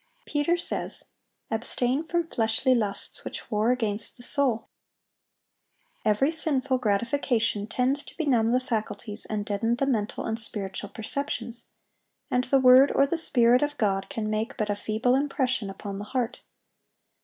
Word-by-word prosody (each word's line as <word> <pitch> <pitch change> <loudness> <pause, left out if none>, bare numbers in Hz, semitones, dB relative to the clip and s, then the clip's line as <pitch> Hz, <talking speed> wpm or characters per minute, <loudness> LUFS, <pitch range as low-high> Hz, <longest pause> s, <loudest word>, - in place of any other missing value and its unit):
Peter 300 +4 +1
says, 345 - -1 0.5
"Abstain 245 +5 0
from 340 +1 0
fleshly 240 -3 +1
lusts, 210 -5 -2
which - - -6
war 215 +2 +2
against 220 -3 -1
the 245 - -11
soul."(814) 250 -5 +2 1.4
Every 220 +8 +3
sinful 280 -5 +1
gratification 225 -1 0
tends 255 +5 +1
to - - -12
benumb 245 -8 +2
the 250 - +3
faculties 225 -3 -3
and 210 -1 -3
deaden 225 +3 0
the 275 - 0
mental 220 -6 -1
and 225 0 -2
spiritual 200 -3 -1
perceptions, 235 0 -3 0.6
and 250 0 +1
the 270 +1 +3
word 260 +2 +7
or 275 - +5
the 280 - -1
Spirit 250 -6 +4
of 290 0 -1
God 195 -3 0
can 225 -7 -3
make 215 +4 -2
but 210 -3 -1
a - - 0
feeble 220 +4 0
impression 260 -5 0
upon 195 0 -6
the 205 - -6
heart. 250 +1 -3
240 Hz, 150 wpm, -26 LUFS, 215-270 Hz, 1.4 s, word